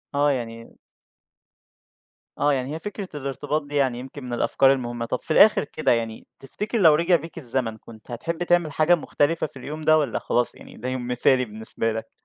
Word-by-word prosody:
آه 145 +1 +3
يعني 115 -3 -5 1.6
آه، 145 0 +3
يعني 135 +1 -2
هي - - -5
فكرة 205 0 -6
الارتباط 145 +2 -2
دي 145 0 -8
يعني 130 -4 +1
يمكن 135 +2 -9
من 125 -1 -5
الأفكار 135 +2 +3
المهمة، 120 -3 -3
طَب 120 +2 -2
في - - -8
الآخر 210 +7 +6
كده 155 +2 -1
يعني 115 -2 -2
تفتكر 210 - -4
لو 165 -7 +6
رجع 170 +3 +3
بيك 165 +1 -4
الزمن 120 -5 -2
كنت 110 +1 -14
هتحب 165 +8 -3
تعمل 175 -3 +2
حاجة 155 +4 +4
مختلفة 160 0 0
في 145 - -13
اليوم 150 +5 -6
ده 155 0 +5
والّا 145 -6 0
خلاص 120 0 0
يعني - - -14
ده 125 +3 -4
يوم 130 -1 -3
مثالي 125 +1 +2
بالنسبة 110 +1 -3
لك؟ 110 - -6
135 Hz, 190 wpm, -24 LUFS, 120-155 Hz, 1.6 s, الآخر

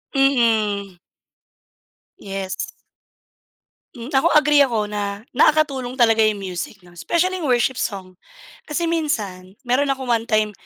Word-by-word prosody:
Mm. 220 -8 +2 1.2
Yes. 195 -1 -5 1.3
Hmm. 240 +4 -8
Ako 270 +4 +3
agree 300 -1 +5
ako 240 -6 +3
na 205 0 -4
nakakatulong 275 -3 +2
talaga 225 -3 +3
yung 215 -2 +2
music 185 +2 -6
'no, 175 - -17
specially 345 - -1
worship 260 -4 +1
song. 185 -4 -5 0.5
Kasi 305 +3 -2
minsan, 215 - -2
meron 255 +3 +1
akong 265 -2 -2
one 230 0 0
time 215 -1 +1
235 Hz, 120 wpm, -21 LUFS, 200-275 Hz, 1.3 s, agree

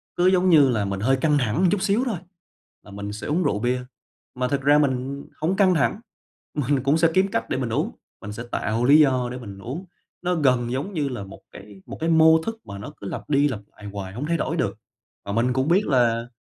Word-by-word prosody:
cứ 175 +1 +3
giống 185 0 +3
như 150 -6 +6
là 110 -5 0
mình 100 -1 -3
hơi 130 +6 +2
căng 150 +2 +2
thẳng 115 +5 0
một 190 - +4
chút 205 - 0
xíu 210 +4 +2
thôi 225 -7 -2 0.7
là 105 - -14
mình 100 +1 -6
sẽ 105 - -6
uống 165 +5 +1
rượu 105 -9 0
bia, 125 +3 0 0.5
mà 125 0 -1
thực 140 +1 -1
ra 145 +2 +5
mình 140 -1 -1 0.2
hổng 170 +5 +1
căng 190 -2 +4
thẳng 160 +6 +1 0.5
mình 140 -2 0
cũng 140 +3 +3
sẽ 165 - +4
kiếm 190 +2 +3
cách - - -2
để - - -1
mình 125 -3 -2
uống, 110 - -1 0.3
mình 105 - -7
sẽ 115 +3 -6
tạo 110 +4 -1
lý 145 +4 +7
do 130 -4 +3
để 125 - -5
mình 100 -6 -9
uống. 140 - -6 0.4
Nó 180 0 0
gần 125 -5 +2
giống 140 +10 -3
như 150 -5 -1
là 120 -6 -5
một 95 0 -11
cái 100 -1 -13
một - - -8
cái 165 - -1
mô 160 0 +6
thức 225 +3 -4
mà 100 - -8
nó 100 - -8
cứ 100 - -8
lặp - - -6
đi 145 0 +3
lặp 130 -7 -3 0.2
lại 105 - -12
hoài 95 -2 -6
hông 125 +7 -4
thay 170 +2 0
đổi - - -2
được. - - -1 0.5
Mà 100 - -4
mình 120 +4 +1
cũng 130 +3 0
biết 190 +5 +3
là 120 -4 +2
135 Hz, 250 wpm, -23 LUFS, 115-160 Hz, 0.7 s, lý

